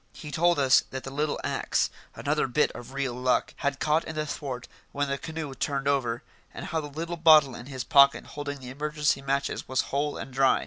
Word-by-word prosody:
He 150 -3 -9
told 170 +4 +3
us 135 -2 +6
that 130 0 -6
the 135 - -7
little 150 +2 -1
axe - - 0 0.2
another 150 0 0
bit 150 +4 +2
of 120 - -10
real 135 -2 -1
luck 125 +1 0
had 140 -1 -1
caught 155 +2 +2
in 160 - -7
the 155 0 -1
thwart 135 -4 -5 0.2
when 145 0 -1
the 140 0 -2
canoe 160 -3 -5
turned 140 +1 -2
over, 120 -4 0 0.3
and - - -7
how 160 - -1
the 145 - -6
little 165 +4 -5
bottle 155 -5 +6
in 120 - -9
his 130 -3 -5
pocket 140 -2 +5
holding 145 -1 -5
the 125 0 -8
emergency 150 0 0
matches 140 0 -2
was 130 0 +1
whole 145 +1 -1
and 130 - -7
dry. 135 0 +4
140 Hz, 215 wpm, -27 LUFS, 135-150 Hz, 0.3 s, us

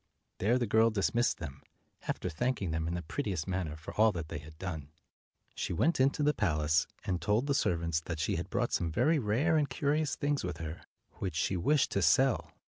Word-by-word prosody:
There 115 +6 +3
the 125 - 0
girl 110 +1 +4
dismissed 115 +3 +1
them, 70 -4 -7 0.5
after - - -2
thanking 95 +2 -1
them 80 0 -1
in 85 - -2
the 90 - -4
prettiest 95 - -3
manner 90 -5 -2
for 80 - -9
all 110 +1 +5
that 85 -2 -5
they - - -4
had 75 +1 -13
done. 80 -5 -5 0.6
She - - -3
went 160 - +2
into 135 +3 +3
the 150 +1 +3
palace, 80 - +1 0.2
and 90 -2 -2
told 105 +5 +1
the 140 - +1
servants 85 - +1
that 85 - -3
she 80 +6 0
had 90 +3 -4
brought 120 +3 -1
some 85 -2 0
very 145 - +3
rare 135 +9 +2
and 145 -3 +1
curious 145 +3 0
things 145 -1 -1
with 90 -3 -3
her, 80 0 -6 0.4
which 90 -5 -3
she 90 +4 0
wished 140 - +2
to 100 - 0
sell. 125 - +3
95 Hz, 210 wpm, -31 LUFS, 80-130 Hz, 0.6 s, all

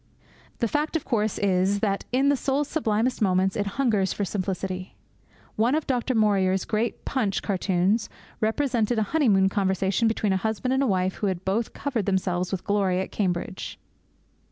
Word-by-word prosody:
The 235 - 0
fact, 300 +7 -1
of 325 - -1
course, 215 -4 0
is 195 0 +2
that 200 -2 0
in 265 +3 +3
the 285 - +4
soul's 275 +2 0
sublimest 245 -5 0
moments 190 -1 +2
it 205 - -1
hungers 215 -8 +2
for 205 - -2
simplicity. 185 -1 -4 0.6
One 235 +6 +3
of 310 - -1
Du 250 -3 0
Maurier's 195 -4 +2
great 225 +2 -2
Punch 220 -8 -1
cartoons 195 +2 +1 0.3
represented 235 0 +1
a 220 - +3
honeymoon 210 -12 +4
conversation 195 +2 +1
between 215 -3 +1
a - - +2
husband 220 +5 -1
and 265 -1 +2
wife 185 -1 0
who 205 - -1
had 185 -1 -3
both 215 +4 -1
covered 250 -8 -2
themselves 185 -2 0
with 190 -2 -3
glory 195 -3 +1
at 190 - -4
Cambridge. 185 -2 -3
205 Hz, 165 wpm, -25 LUFS, 190-235 Hz, 0.6 s, the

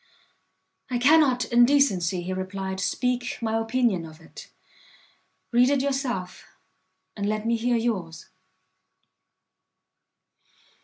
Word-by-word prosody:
"I 250 - -1
cannot 265 -1 +4
in 240 0 +4
decency," 195 -10 +2
he 185 +2 -4
replied, 190 0 -5
"speak 250 +6 -2
my 225 -1 -2
opinion 225 -5 0
of 160 0 -12
it: 160 - -13 1.0
read 245 +2 +4
it 280 -2 +1
yourself, 260 -10 -3 0.7
and 205 -1 -2
let 215 0 -2
me 230 0 +1
hear 240 +1 0
yours." 195 -9 -3
230 Hz, 105 wpm, -25 LUFS, 190-250 Hz, 1.0 s, cannot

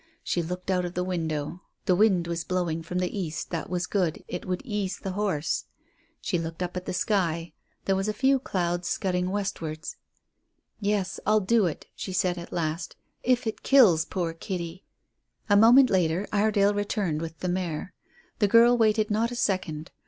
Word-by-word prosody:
She 175 - 0
looked 180 +3 -4
out 180 -1 +1
of 175 0 -5
the 180 - 0
window. 165 -2 -3 0.2
The 185 - +4
wind 190 -3 +3
was 170 0 -3
blowing 175 -3 -1
from 170 +2 -5
the 180 +2 -1
east; 165 -6 -4
that 165 -3 -3
was 175 0 -1
good, 180 -6 -1
it - - -6
would 180 +4 -2
ease 205 -5 -2
the 195 - -5
horse. 185 -6 -1 0.6
She 175 - -1
looked 165 +2 -4
up 180 0 -5
at 180 0 -5
the - - -1
sky, 175 -4 0 0.3
there 195 - +2
were 190 - 0
a - - +2
few 265 +4 +2
clouds 175 -6 -2
scudding 180 -1 0
westwards. 185 -6 -4 0.8
"Yes, 205 -2 -1
I'll 215 0 +4
do 210 0 +3
it," 155 - -5
she 190 - -6
said 180 -1 +1
at 170 - -9
last, 165 0 -3 0.3
"if 250 0 +2
it 220 - -3
kills 200 -13 +5
poor 170 -2 -2
Kitty." 170 +1 -5 0.7
A - - +7
moment 240 +5 +7
later 180 +1 +1
Iredale 205 -1 +3
returned 205 -6 -1
with 165 -1 -6
the 185 - -4
mare. 175 -1 -3 0.5
The 205 - +4
girl 235 +3 +6
waited 215 -2 +2
not 225 +3 +1
a 245 - -6
second. 185 - -1
185 Hz, 180 wpm, -27 LUFS, 170-205 Hz, 0.8 s, A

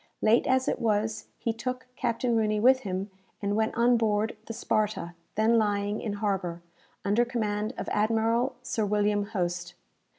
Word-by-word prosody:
Late 220 +2 +4
as 260 0 +2
it - - 0
was, 215 -1 0
he 230 - -1
took 250 +3 -4
Captain 235 0 0
Rooney 215 -1 +2
with 260 +4 +6
him, 195 -2 -4 0.3
and 205 0 -1
went 220 +1 0
on 240 +1 +5
board 220 -1 +1
the - - -4
"Sparta," 215 -6 -1 0.2
then 225 +2 +4
lying 205 0 0
in 215 - -3
harbour, 190 -5 -2 0.4
under 205 +4 +3
command 220 -1 -2
of - - -4
Admiral 225 +4 +1
Sir 235 -3 -1
William 205 0 +1
Hoste. 175 -4 -3
215 Hz, 160 wpm, -28 LUFS, 205-235 Hz, 0.4 s, with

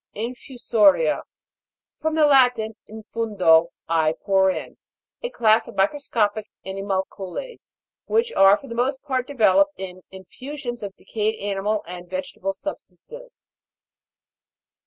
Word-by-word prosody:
INFUSO'RIA. 225 - +2 0.7
From 315 0 -2
the 310 -1 +5
Latin, 250 -6 +4
in 220 +1 -10
fundo, 185 -8 +4 0.2
I 160 -1 +2
pour 190 -1 +3
in. 185 - -4 0.4
A - - -3
class 225 - +3
of - - -10
microscopic 215 -1 0 0.2
animalcules, 195 - -5 0.4
which 455 +1 +1
are 195 +1 +6
for 275 - -13
the 235 - -6
most 260 +3 0
part 260 -3 -2
developed 285 +3 +3
in 185 -1 -7
infusions 240 +6 -8
of 200 -2 -6
decayed 220 0 -2
animal 205 +1 -1
and 175 0 -9
vegetable 185 +1 -4
substances. 480 - -10
215 Hz, 115 wpm, -23 LUFS, 190-260 Hz, 0.7 s, are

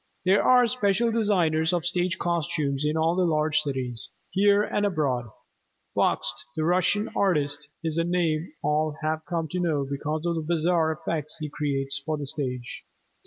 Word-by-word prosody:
There 190 +2 +5
are 250 -1 +6
special 230 -1 +1
designers 180 -7 +2
of 175 -2 0
stage 175 0 0
costumes 150 -5 -1
in 150 +1 +1
all 165 +2 +2
the 185 - +2
large 155 -2 +2
cities, 130 -5 -4 0.2
here 200 +1 +4
and 210 - -1
abroad. 145 -11 0 0.7
Bakst, 120 - +1 0.2
the 155 - -1
Russian 185 +5 +2
artist, 145 -6 0
is 160 0 -1
a - - +3
name 170 -2 0
all 150 +1 +1
have 155 0 -1
come 165 -2 -1
to 180 - -2
know 155 -5 0
because 150 +3 -3
of 170 - +1
the 165 - -2
bizarre 165 0 +1
effects 155 -1 -4
he 155 -1 -4
creates 135 -2 -2
for 155 0 -2
the 145 - -4
stage. 125 -3 -4
160 Hz, 165 wpm, -26 LUFS, 150-180 Hz, 0.7 s, are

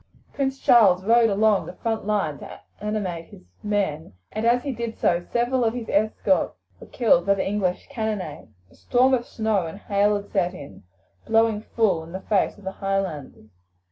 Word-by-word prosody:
Prince 270 -1 -1
Charles 195 -8 +5
rode 230 +1 +5
along 210 0 +2
the - - -8
front 225 -2 -3
line 195 -9 0
to - - -10 0.2
animate 195 -6 -3
his - - -15 0.2
men, 195 - -2 0.2
and 215 +2 -1
as 245 +1 +3
he 280 - -2
did 235 -2 -5
so 175 0 +1
several 245 +1 +1
of 225 +1 0
his 235 -3 -5
escort 215 +7 +1 0.2
were - - -12
killed 205 -7 +2
by 200 - +4
the 190 - -2
English 190 -3 -1
cannonade. 220 - -4 0.2
A - - -21
storm 255 +2 +2
of 240 -2 0
snow 215 -6 -1
and 160 - -8
hail 205 0 +1
had 205 0 -6
set 185 -2 0
in, 140 - -11 0.5
blowing 225 -1 +2
full 205 -8 0
in 165 +2 -12
the 190 - -5
face 205 0 0
of 205 - -16
the 190 - -4
Highlanders. 190 - -4
210 Hz, 185 wpm, -24 LUFS, 185-225 Hz, 0.5 s, Charles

